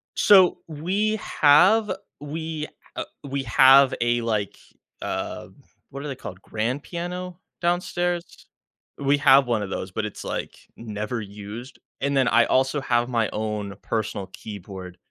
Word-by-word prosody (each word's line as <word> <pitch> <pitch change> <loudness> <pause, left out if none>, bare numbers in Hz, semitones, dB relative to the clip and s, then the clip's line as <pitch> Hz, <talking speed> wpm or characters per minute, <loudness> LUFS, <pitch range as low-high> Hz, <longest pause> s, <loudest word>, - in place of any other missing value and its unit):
So, 190 -4 +6
we 190 +8 -1
have 195 +5 +4 0.3
we, 155 +1 -4 0.3
uh - - -3 0.2
we 140 -1 -3
have 135 +2 +6
a, 120 0 +2
like, 110 -3 -2 0.4
um - - -5 0.3
what 140 +2 -7
are - - -4
they 135 - -4
called, 95 -6 -9
grand 120 +8 -2
piano 180 +1 -5 0.2
downstairs? 175 0 -1 0.5
We 140 +1 +2
have 135 -2 +6
one 115 -3 +1
of 100 - -5
those, 95 0 -4
but 105 +3 -2
it's, 105 - -7
like, - - -4 0.2
never 110 +1 -4
used. 105 +5 -9 0.2
And 140 +1 0
then 130 -3 +3
I - - +5
also 135 +2 +1
have 120 0 +1
my 115 -3 +1
own 105 -2 -3
personal 105 -2 -3
keyboard, 95 -3 -9
130 Hz, 145 wpm, -24 LUFS, 110-160 Hz, 0.5 s, So